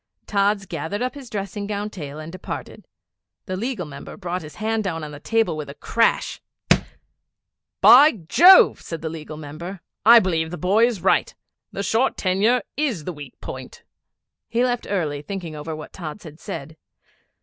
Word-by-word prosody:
Tods 200 0 +1
gathered 170 +6 -4
up 255 - -2
his 275 -4 -10
dressing 200 -1 -4
gown 210 0 -3
tail 150 -6 -7
and 155 +1 -8
departed. 185 - -7 0.6
The 185 - -3
Legal 225 -2 -3
Member 140 -2 -10
brought 180 -1 -3
his 150 -1 -11
hand 220 0 -1
down 165 -5 -3
on 150 - -6
the 145 - -9
table 225 -1 +1
with 150 -2 -6
a 140 - -9
crash 230 +8 0 1.4
'By 290 +5 +9
Jove!' 365 - +7
said 165 -2 -6
the 160 - -2
Legal 155 -1 -8
Member, 165 +5 -8 0.2
'I 230 +4 +9
believe 165 -3 0
the 175 - -6
boy 205 +7 +3
is 215 -8 -4
right. 190 - +2 0.4
The 200 - -4
short 225 +6 +1
tenure 205 +6 +2
is 255 - -1
the 180 - -4
weak 145 -4 -11
point.' - - -8 0.7
He 235 +2 +1
left 245 -1 -1
early, 155 -8 -1
thinking 170 -1 -6
over 155 +2 -5
what 155 - -10
Tods 170 +2 -7
had 155 -1 -11
said. 155 +1 -7
185 Hz, 170 wpm, -23 LUFS, 155-220 Hz, 1.4 s, By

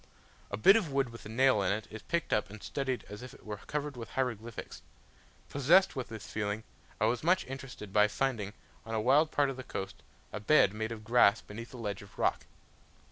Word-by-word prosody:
A 100 - -3
bit 195 - +7
of 195 -10 +1
wood 135 -2 +1
with 115 -2 -10
a - - -10
nail 130 -1 +4
in 95 - +1
it, 105 +2 -2
is 110 0 -7
picked 170 0 -1
up 105 -4 +1
and 110 +1 -11
studied 135 -3 -2
as 105 +1 -8
if 125 0 -9
it - - -18
were 105 -1 -5
covered 150 +4 -4
with 115 -2 -7
hieroglyphics. 115 -4 -4 0.7
Possessed 170 +8 +4
with 130 -2 -3
this 110 -4 -7
feeling, 105 0 -3 0.4
I 110 - +3
was 115 +2 +1
much 180 +3 +3
interested 130 -6 -8
by 105 0 +6
finding, 105 -3 -1 0.3
on 115 0 -4
a - - +1
wild 140 +8 +4
part 145 -3 +2
of 130 - -8
the 130 - -6
coast, 95 -5 -6 0.3
a 105 - -3
bed 105 -3 +5
made 110 +1 -3
of 110 -2 -6
grass 115 -2 +5
beneath 115 +3 -9
a 130 - -9
ledge 105 -4 -4
of 100 -1 -15
rock. - - +1
115 Hz, 220 wpm, -31 LUFS, 105-135 Hz, 0.7 s, bit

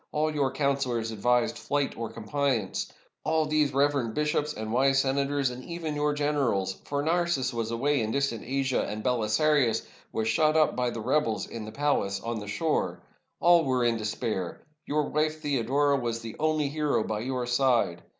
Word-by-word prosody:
All 155 +1 0
your 140 -3 +1
counselors 130 -5 0
advised 120 +3 +1
flight 145 -1 -1
or 115 -1 -4
compliance; 115 -2 -1 0.3
all 160 0 +2
these 150 -2 +2
reverend 140 -4 +1
bishops 150 0 0
and 110 -4 -5
wise 135 +2 +3
senators, 140 0 +1
and 125 +1 -8
even 170 -1 -4
your 150 0 0
generals; 135 -11 0
for 145 0 -2
Narses 165 -6 +1
was 115 -1 -2
away 135 +4 +1
in 110 - -1
distant 140 -2 -1
Asia, 135 0 0
and 105 0 -4
BeHsarius 125 +2 +2 0.3
v/as 110 0 -1
shut 155 +4 +3
up 155 - +3
by 125 -1 0
the 115 - -5
rebels 115 -3 +1
in 115 -2 -7
the 110 - -7
palace 125 -9 0
on 115 +1 -3
the 105 - -8
shore. 155 +9 -1 0.4
All 175 -1 +5
were 130 -3 +1
in 115 -1 +2
despair. 105 -4 -3 0.2
Your 150 +1 +1
wife 155 +1 0
Theodora 140 0 +1
was 115 -2 -2
the 115 -1 -7
only 155 -1 +1
hero 150 -5 0
by 110 -1 -3
your 125 +2 -2
side. 120 -8 +2
135 Hz, 175 wpm, -28 LUFS, 115-150 Hz, 0.4 s, All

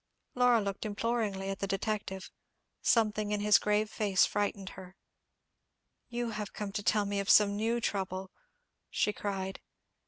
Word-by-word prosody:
Laura 245 -2 +4
looked 200 -2 -3
imploringly 210 -2 -1
at 195 - -5
the 195 - -2
detective. 195 -1 -3 0.5
Something 215 -2 +2
in 210 0 0
his 210 0 +5
grave 210 +1 +1
face 205 -3 +2
frightened 200 -2 -2
her. 185 0 -11 1.1
"You 240 -1 -2
have 210 -1 -5
come 205 -2 -4
to 205 - -3
tell 210 0 +2
me 200 0 -1
of 200 - -3
some 205 -1 +6
new 225 +3 0
trouble," 190 -3 -3 0.6
she 210 - +1
cried. 195 -2 -4
205 Hz, 150 wpm, -31 LUFS, 195-215 Hz, 1.1 s, some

